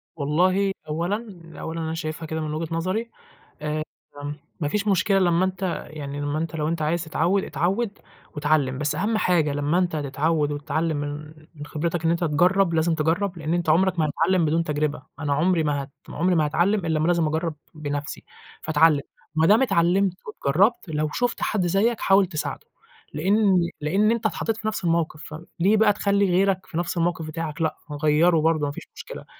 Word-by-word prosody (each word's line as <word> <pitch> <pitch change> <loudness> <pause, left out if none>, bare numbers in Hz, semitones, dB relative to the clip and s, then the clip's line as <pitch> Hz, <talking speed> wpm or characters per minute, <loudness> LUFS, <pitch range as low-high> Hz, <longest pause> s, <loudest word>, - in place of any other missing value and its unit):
والله 185 +7 +2 0.2
أولًا 185 +5 -3 0.2
أقول 160 +1 -5
أنا 160 -1 -3
شايفها 160 0 -4
كده 160 0 -3
من 155 -1 -3
وجهة 165 +1 -3
نظري 190 +8 -2 0.5
آ 150 0 -2 0.8
ما 150 - -1
فيش 210 +7 -1
مشكلة 195 +1 +3
لمّا 175 0 +3
أنتِ 185 -1 -3
يعني 145 -2 -6
لمّا 145 +1 -1
أنت 165 0 -3
لو 150 -1 -1
أنت 165 0 -2
عايز 160 +2 0
تتعوّد 175 +4 +1
اتعوّد 195 +9 -1 0.4
واتعلم، 145 -3 +1
بس 150 +1 -1
أهم 210 +6 0
حاجة 165 -7 +2
لمّا 145 +4 0
أنت 175 -3 0
تتعوّد 150 +1 0
وتتعلم 155 +2 -1
من 145 +1 -5 0.2
من 145 -1 -8
خبرتك 165 +3 -2
إن 165 - +4
أنت 170 +1 0
تجرّب 175 +3 +3
لازم 160 +1 +2
تجرّب، 170 +4 0
لإن 155 +1 -2
أنت 175 -2 0
عُمرك 180 +2 +3
ما 155 - +3
هتتعلم 170 +3 +2
بدون 165 +2 +1
تجرِبة. 150 -3 -2 0.2
أنا 145 -2 0
عُمري 165 +3 +2
ما 145 -2 0
هت 135 - -13 0.2
ما - - -8
عُمري 180 +2 +2
ما 155 -2 +3
هاتعلم 175 +5 +1
إلّا 160 -1 +1
ما 160 - +1
لازم 170 -2 +2
أجرّب 160 +1 -1 0.2
بنَفْسي، 145 -1 -5 0.4
فاتعلم. 155 -1 +4 0.3
ما 160 +1 +3
دام 215 +5 +6
اتعلمت 190 -3 +3
واتجرّبت 200 - +1
لو 155 -1 -1
شُفت 245 -1 -1
حد 190 -4 0
زيّك 205 +6 +2
حاول 195 0 +5
تساعده، 160 -4 -5 0.5
لإن 195 +5 +3 0.3
لإن 200 +9 +2
أنت 230 -1 -1
اتحطّيت 220 0 -1
في 220 - -4
نَفْس 215 -3 -2
الموقِف، 165 -2 0
فم 160 +2 -9
ليه 200 +5 +4
بقى 210 -1 +5
تخلّي 200 -1 +2
غيرك 190 +1 +2
في 165 - -7
نَفْس 175 0 -2
الموقِف 170 -1 0
بتاعك؟ 155 0 -5
لأ، 160 - 0 0.3
غيّره 160 +3 +4
برضه 155 -1 +2
ما 145 - -2
فيش - - -9
مشكلة، - - -9
165 Hz, 190 wpm, -24 LUFS, 155-185 Hz, 0.8 s, دام